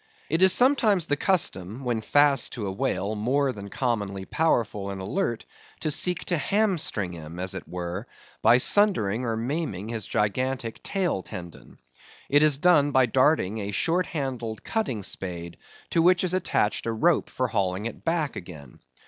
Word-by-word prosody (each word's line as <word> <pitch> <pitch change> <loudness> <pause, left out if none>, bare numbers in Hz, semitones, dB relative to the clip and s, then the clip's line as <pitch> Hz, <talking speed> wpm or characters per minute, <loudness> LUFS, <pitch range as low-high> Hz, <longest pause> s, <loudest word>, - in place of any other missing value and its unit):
It 165 +3 +1
is 190 0 +7
sometimes 220 - +3
the 145 - +1
custom 130 - 0
when 120 -3 -1
fast 145 +1 +3
to 110 - -4
a 95 - -2
whale 95 +1 -1
more 130 +6 +1
than 100 -4 -8
commonly 100 -6 -2
powerful 110 -11 0
and 100 -1 -5
alert, 115 - -2 0.4
to 155 - -1
seek 180 +4 0
to 175 - 0
hamstring 160 - 0
him, 80 0 -9
as 95 +1 -3
it 95 - -7
were, 90 +5 -5 0.3
by 115 +3 +6
sundering 125 - +2
or 115 -1 -1
maiming 115 - -3
his 115 -4 -4
gigantic 115 +3 -1
tail 185 - -1
tendon. 85 -2 -10 0.5
It 145 +1 +5
is 150 -2 +4
done 150 -3 +4
by 130 -2 +4
darting 125 -4 +2
a 100 -1 -4
short 165 - +1
handled 125 -8 -4
cutting 135 - -2
spade, 85 -3 -6 0.3
to 165 - +3
which 180 +2 +4
is 180 -1 +1
attached 145 - 0
a - - +1
rope 155 +9 +2
for 130 -1 -2
hauling 95 0 -1
it 115 - -6
back 165 -3 -1
again. 75 -8 -10
120 Hz, 165 wpm, -26 LUFS, 100-160 Hz, 0.5 s, is